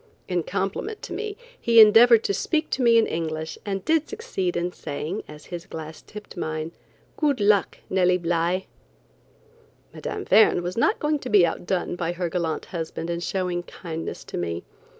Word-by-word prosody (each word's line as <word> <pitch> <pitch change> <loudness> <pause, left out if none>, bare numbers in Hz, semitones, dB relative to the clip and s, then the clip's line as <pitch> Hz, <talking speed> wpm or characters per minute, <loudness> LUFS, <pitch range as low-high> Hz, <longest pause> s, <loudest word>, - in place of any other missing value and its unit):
In 180 -2 0
compliment 200 - -3
to - - -6
me, 420 +2 -4 0.2
he 230 -1 +5
endeavored 225 +2 +8
to - - 0
speak 315 - -1
to 265 - 0
me 235 -2 +6
in 225 - +5
English, 160 -1 -4
and 195 -1 -3
did 320 -1 +2
succeed 195 - -3
in 175 +1 -1
saying, 155 +5 -5
as 150 0 -12
his 170 -1 -6
glass 160 0 -8
tipped 210 -1 -11
mine: 155 -2 -3 0.5
"Good 290 -5 +1
luck, 205 -1 +3
Nellie 180 -1 +3
Bly." 175 +2 0 1.3
Mme. 420 - -5
Verne 205 - +5
was 175 +1 -3
not 415 - +2
going 300 0 0
to 255 - -6
be 200 -6 +6
outdone 175 +1 -2
by 175 -1 -2
her 175 -1 -2
gallant 165 -3 -2
husband 165 0 -4
in 170 - -2
showing 180 0 -2
kindness 165 -2 -6
to - - -6
me. 85 0 -3
180 Hz, 170 wpm, -24 LUFS, 170-230 Hz, 1.3 s, endeavored